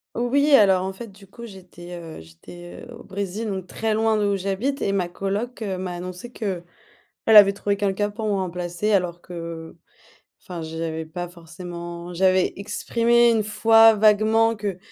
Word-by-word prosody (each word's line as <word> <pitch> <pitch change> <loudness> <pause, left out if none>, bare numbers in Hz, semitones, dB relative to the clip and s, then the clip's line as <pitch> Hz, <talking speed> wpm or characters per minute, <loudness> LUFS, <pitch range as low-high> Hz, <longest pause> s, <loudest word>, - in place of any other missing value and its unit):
Oui, 280 +5 +1
alors 190 -5 +4
en 190 - -4
fait, 230 +5 -9
du 195 +1 -17
coup, 235 +5 -11
j'étais, 180 -3 -11
heu, 165 - -9
j'étais, 130 - -13
heu, 245 - -11
au 235 - -12
Brésil 200 +3 -5
donc 190 -3 -4
très 220 +3 -2
loin 220 0 +2
d'où 205 -1 +1
j'habite 200 +9 -2
et 200 - 0
ma 190 -3 0
colloc, 205 +6 -4
heu, 190 -3 -3
m'a 180 -1 -4
annoncé 185 +6 -8
qu'elle 195 -7 -4 0.6
avait 210 -3 +8
trouvé 200 0 -2
quelqu'un 205 0 -1
pour 220 +1 -5
me 210 - 0
remplacer 180 +1 -2
alors 180 -3 0
que 165 -2 -8 0.7
enfin, 175 -3 -8
j'avais 160 0 -4
pas 175 +2 -6
forcément 170 0 -9
j'avais 185 +1 +2
exprimé 235 +4 +2
1 220 -2 +2
fois 225 +1 +6
vaguement 220 +2 +3
que 200 -3 -4
195 Hz, 170 wpm, -23 LUFS, 175-215 Hz, 0.7 s, avait